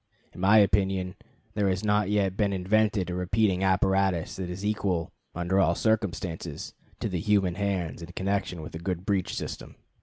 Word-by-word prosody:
In -, -, -9 dB
my 100 Hz, +3 st, +6 dB
opinion 95 Hz, -2 st, +2 dB, 0.4 s
there 100 Hz, -2 st, +1 dB
has 95 Hz, +1 st, -1 dB
not 105 Hz, -1 st, +2 dB
yet 100 Hz, -2 st, +1 dB
been 100 Hz, -1 st, +1 dB
invented 95 Hz, 0 st, +1 dB
a -, -, -2 dB
repeating 95 Hz, +1 st, +1 dB
apparatus 95 Hz, -2 st, +2 dB
that 95 Hz, -2 st, -4 dB
is 95 Hz, +3 st, -5 dB
equal, 95 Hz, -6 st, -1 dB, 0.2 s
under 90 Hz, +2 st, +1 dB
all 85 Hz, -3 st, +3 dB
circumstances, 90 Hz, -8 st, -2 dB, 0.3 s
to -, -, -1 dB
the 90 Hz, -4 st, -2 dB
human 100 Hz, -2 st, +2 dB
hands 90 Hz, -5 st, -2 dB
in 85 Hz, +1 st, -8 dB
connection 95 Hz, -3 st, -2 dB
with 75 Hz, -, -9 dB
a 80 Hz, -, -5 dB
good 90 Hz, 0 st, -3 dB
breech 100 Hz, -3 st, 0 dB
system. -, -, -6 dB
95 Hz, 175 wpm, -27 LUFS, 90-100 Hz, 0.4 s, my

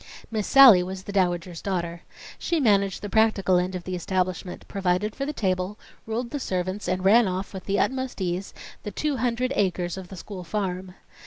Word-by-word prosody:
Miss 215 Hz, -2 st, -2 dB
Sallie 265 Hz, -9 st, +9 dB
was 185 Hz, +1 st, -5 dB
the 200 Hz, -, -7 dB
Dowager's 175 Hz, -3 st, 0 dB
daughter. 170 Hz, -3 st, -3 dB, 0.4 s
She 340 Hz, -2 st, 0 dB
managed 200 Hz, -7 st, +2 dB
the -, -, -3 dB
practical 205 Hz, -4 st, +3 dB
end 180 Hz, +1 st, -2 dB
of 180 Hz, -, -5 dB
the 185 Hz, -, -5 dB
establishment 185 Hz, 0 st, -2 dB
provided 195 Hz, +2 st, -1 dB
for 275 Hz, -, -3 dB
the -, -, -1 dB
table, 190 Hz, -4 st, -1 dB, 0.3 s
ruled 235 Hz, +2 st, -3 dB
the 290 Hz, -, -3 dB
servants, 185 Hz, -2 st, -3 dB
and 185 Hz, +1 st, -1 dB
ran 220 Hz, +3 st, +6 dB
off, 185 Hz, +2 st, -3 dB
with 190 Hz, -, -7 dB
the 200 Hz, -, 0 dB
utmost 260 Hz, -2 st, -1 dB
ease, 185 Hz, +1 st, -2 dB, 0.3 s
the -, -, -5 dB
two 295 Hz, +5 st, -2 dB
hundred 250 Hz, +2 st, 0 dB
acres 180 Hz, -2 st, 0 dB
of 190 Hz, -1 st, -7 dB
the 190 Hz, -, -10 dB
school 185 Hz, +1 st, -8 dB
farm. 185 Hz, -1 st, -3 dB
190 Hz, 190 wpm, -25 LUFS, 180-220 Hz, 0.4 s, Sallie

